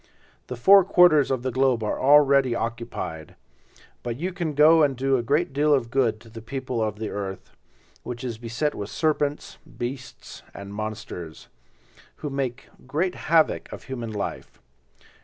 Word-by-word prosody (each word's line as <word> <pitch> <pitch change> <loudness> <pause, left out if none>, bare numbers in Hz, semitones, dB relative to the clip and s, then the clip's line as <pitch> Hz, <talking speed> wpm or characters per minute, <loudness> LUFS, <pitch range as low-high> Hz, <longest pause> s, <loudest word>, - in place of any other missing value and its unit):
The 125 - -5
four 195 +11 +7
quarters 175 -6 +5
of 130 -2 -1
the 130 - -1
globe 130 -3 +1
are 105 - -2
already 140 -2 +5
occupied, 115 -10 -5 0.7
but 120 -1 -4
you 180 +5 -3
can 170 -5 -3
go 155 +3 +6
and 140 -4 +2
do 135 +1 +1
a 125 - +1
great 145 +5 0
deal 145 +1 +3
of 115 -4 -2
good 120 -5 +1
to 115 - -15
the 115 0 -9
people 130 0 -4
of 105 -1 -2
the 110 -1 -4
earth, 95 -2 -6 0.5
which 120 +1 -7
is 120 -3 -5
beset 120 +6 -2
with 100 0 -6
serpents, 150 -1 -1 0.2
beasts 125 +2 -7
and 100 0 -8
monsters, 100 -6 -7 0.7
who 145 - -6
make 135 -2 -3 0.2
great 170 +7 -1
havoc 160 0 +1
of - - -9
human 120 -4 -6
life. 105 -2 -6
130 Hz, 160 wpm, -24 LUFS, 115-145 Hz, 0.7 s, four